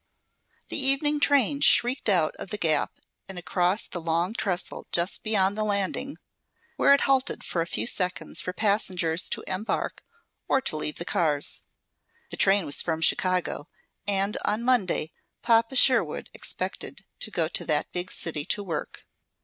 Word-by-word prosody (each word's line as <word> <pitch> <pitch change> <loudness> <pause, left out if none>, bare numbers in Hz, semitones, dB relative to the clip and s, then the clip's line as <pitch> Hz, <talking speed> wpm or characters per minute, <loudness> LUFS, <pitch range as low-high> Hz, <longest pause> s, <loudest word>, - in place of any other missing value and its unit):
The - - +3
evening 290 +2 +2
train 285 -1 +3
shrieked 245 -1 +4
out 175 -6 +2
of - - -8
the 210 - -3
gap 160 -6 +1 0.3
and 190 - -6
across 180 +3 +1
the 175 - -6
long 170 +4 0
trestle 190 -5 -3
just 175 +2 0
beyond 205 -3 +2
the 215 - -1
landing, 210 +7 -2 0.6
where 280 - +5
it - - -1
halted 270 0 +1
for 170 - -2
a 165 - -2
few - - -2
seconds 180 -6 0
for 180 - -4
passengers 185 -5 0
to - - -3
embark 190 +4 -2 0.4
or 270 - +3
to 265 -11 -1
leave 150 0 -1
the 170 - -6
cars. 150 -5 -1 0.7
This - - -5
train 195 -2 +4
was 145 - +2
from 160 -1 -2
Chicago, 180 -3 0 0.4
and 200 0 +1
on 215 +3 0
Monday 205 -10 +1 0.3
Papa 230 +2 +3
Sherwood 255 0 +3
expected - - -5
to - - -3
go - - 0
to - - 0
that - - 0
big 180 0 -3
city 155 -3 -2
to 205 - -1
work. 165 -6 -6
195 Hz, 160 wpm, -26 LUFS, 175-230 Hz, 0.7 s, where